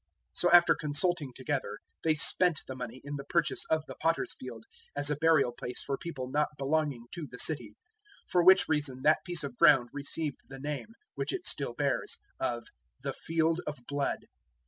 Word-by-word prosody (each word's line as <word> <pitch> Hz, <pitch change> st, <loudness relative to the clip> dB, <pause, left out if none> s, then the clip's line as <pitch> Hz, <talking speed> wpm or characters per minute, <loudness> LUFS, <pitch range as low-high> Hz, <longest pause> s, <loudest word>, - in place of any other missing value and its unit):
027:007 -, -, -12 dB
So 175 Hz, -, +3 dB
after 175 Hz, 0 st, +8 dB
consulting 150 Hz, -1 st, 0 dB
together 135 Hz, +1 st, -2 dB, 0.3 s
they 160 Hz, -1 st, +3 dB
spent 170 Hz, +2 st, +3 dB
the 130 Hz, -, -6 dB
money 125 Hz, 0 st, -7 dB
in 145 Hz, +1 st, -5 dB
the 140 Hz, -, -6 dB
purchase 170 Hz, +2 st, 0 dB
of 155 Hz, -1 st, +1 dB
the -, -, -8 dB
Potter's 165 Hz, 0 st, 0 dB
Field 115 Hz, -3 st, -9 dB, 0.3 s
as 145 Hz, +1 st, +1 dB
a -, -, +2 dB
burial 150 Hz, -4 st, +4 dB
place 125 Hz, +1 st, -6 dB
for 140 Hz, -, -1 dB
people 135 Hz, -5 st, -6 dB
not 150 Hz, +3 st, +1 dB
belonging 140 Hz, -3 st, 0 dB
to 165 Hz, -4 st, -5 dB
the 125 Hz, -, -9 dB
city; 120 Hz, -10 st, 0 dB, 0.5 s
027:008 -, -, -22 dB
for 175 Hz, -1 st, +4 dB
which 185 Hz, +2 st, +7 dB
reason 145 Hz, -4 st, 0 dB
that 155 Hz, -, +4 dB
piece 175 Hz, -4 st, -1 dB
of 135 Hz, -4 st, -6 dB
ground 125 Hz, -4 st, +6 dB
received 145 Hz, +1 st, -3 dB
the 135 Hz, -, -8 dB
name, 145 Hz, 0 st, -4 dB, 0.3 s
which -, -, -2 dB
it 380 Hz, -2 st, -4 dB
still -, -, -3 dB
bears, -, -, 0 dB, 0.2 s
of 120 Hz, -1 st, -1 dB, 0.4 s
`the -, -, -1 dB
Field 165 Hz, +1 st, 0 dB
of 150 Hz, -, -3 dB
Blood.' 145 Hz, -1 st, -1 dB
145 Hz, 190 wpm, -30 LUFS, 130-160 Hz, 0.5 s, after